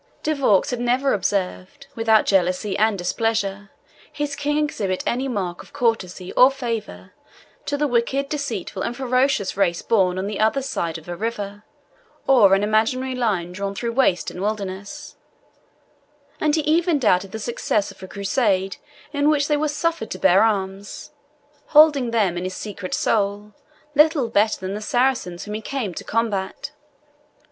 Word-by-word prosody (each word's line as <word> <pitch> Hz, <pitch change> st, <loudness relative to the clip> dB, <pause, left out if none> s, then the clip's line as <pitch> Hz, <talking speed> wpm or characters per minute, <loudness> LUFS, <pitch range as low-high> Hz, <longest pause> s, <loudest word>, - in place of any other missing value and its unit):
De 310 Hz, -, +1 dB
Vaux 255 Hz, -10 st, +3 dB
had 245 Hz, -, -2 dB
never 250 Hz, +3 st, +1 dB
observed 195 Hz, +6 st, -2 dB
without 225 Hz, -2 st, +3 dB
jealousy 190 Hz, +1 st, +1 dB
and 215 Hz, 0 st, +2 dB
displeasure 205 Hz, +1 st, -1 dB, 0.4 s
his 295 Hz, -1 st, -3 dB
King 290 Hz, +1 st, -1 dB
exhibit 210 Hz, -11 st, -1 dB
any 255 Hz, +3 st, -1 dB
mark 190 Hz, -8 st, -3 dB
of -, -, -17 dB
courtesy 190 Hz, -6 st, -1 dB
or 255 Hz, -, +7 dB
favour 230 Hz, -, -5 dB, 0.5 s
to 285 Hz, -, -1 dB
the 295 Hz, +1 st, +1 dB
wicked, 265 Hz, +3 st, 0 dB
deceitful, 245 Hz, -, -4 dB
and 240 Hz, +4 st, -3 dB
ferocious 255 Hz, -5 st, +1 dB
race 180 Hz, -3 st, +1 dB
born 185 Hz, -5 st, +2 dB
on 190 Hz, -, -2 dB
the 205 Hz, 0 st, -4 dB
other 220 Hz, +5 st, +2 dB
side 170 Hz, -10 st, -3 dB
of 160 Hz, -, -14 dB
a 175 Hz, -, -4 dB
river, 205 Hz, -1 st, -4 dB, 0.6 s
or 215 Hz, -8 st, +6 dB
an 195 Hz, -, 0 dB
imaginary 225 Hz, +5 st, +1 dB
line 205 Hz, -9 st, -1 dB
drawn 200 Hz, +2 st, -4 dB
through 235 Hz, +3 st, -2 dB
waste 230 Hz, -9 st, +1 dB
and 180 Hz, -, -8 dB
wilderness; 205 Hz, +7 st, -5 dB, 1.2 s
and 305 Hz, -1 st, +2 dB
he 315 Hz, -, +1 dB
even 325 Hz, +2 st, +2 dB
doubted 195 Hz, -7 st, +2 dB
the 220 Hz, -, -5 dB
success 215 Hz, -2 st, -1 dB
of -, -, -17 dB
a 190 Hz, -, -8 dB
Crusade 200 Hz, -1 st, 0 dB, 0.4 s
in 285 Hz, +1 st, +2 dB
which 290 Hz, -2 st, +2 dB
they 300 Hz, -, +2 dB
were 305 Hz, +1 st, 0 dB
suffered 300 Hz, -4 st, -2 dB
to -, -, -5 dB
bear 190 Hz, +1 st, +4 dB
arms, 200 Hz, -2 st, -2 dB, 0.6 s
holding 295 Hz, -5 st, +5 dB
them 200 Hz, -7 st, +1 dB
in -, -, -5 dB
his 185 Hz, 0 st, -4 dB
secret 200 Hz, -3 st, -5 dB
soul 205 Hz, 0 st, 0 dB, 0.4 s
little 300 Hz, -4 st, +4 dB
better 215 Hz, -1 st, +2 dB
than 190 Hz, +1 st, -4 dB
the 210 Hz, -, -5 dB
Saracens 235 Hz, -7 st, 0 dB
whom 210 Hz, -, -6 dB
he 215 Hz, -, -4 dB
came 230 Hz, -6 st, -3 dB
to -, -, -7 dB
combat. 210 Hz, -4 st, -2 dB
220 Hz, 165 wpm, -22 LUFS, 195-265 Hz, 1.2 s, or